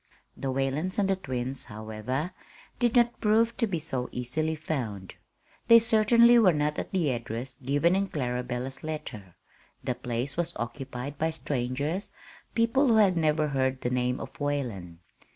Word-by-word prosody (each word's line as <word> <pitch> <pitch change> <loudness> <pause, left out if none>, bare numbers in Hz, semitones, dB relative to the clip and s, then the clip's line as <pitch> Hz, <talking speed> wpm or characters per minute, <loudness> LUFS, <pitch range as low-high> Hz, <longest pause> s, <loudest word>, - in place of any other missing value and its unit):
The 135 - -3
Whalens 135 +7 -1
and 200 -2 +2
the 195 - +2
twins, 130 -6 -4
however, 110 - -4 0.5
did 240 -1 +2
not 240 -1 +3
prove 225 +2 +3
to 230 - +1
be 185 -4 -1
so 135 -6 -2
easily 155 +6 -1
found. 120 -12 -4 0.5
They 230 0 +9
certainly 230 +1 +5
were 190 -6 +5
not 150 0 0
at - - -4
the 170 -7 +1
address 120 +2 -5
given 145 +7 +2
in 195 +1 +1
Clarabella's 125 -2 -3
letter. 150 - -6 0.5
The - - 0
place 125 +5 -4
was 170 0 0
occupied 130 +3 -5
by 160 - +2
strangers 145 - -2 0.5
people 230 +5 +3
who 230 - +4
had 200 -4 +5
never 155 -2 +2
heard 130 -1 0
the 125 - -1
name 125 0 0
of - - -9
Whalen. 115 - -3
145 Hz, 155 wpm, -28 LUFS, 125-185 Hz, 0.5 s, They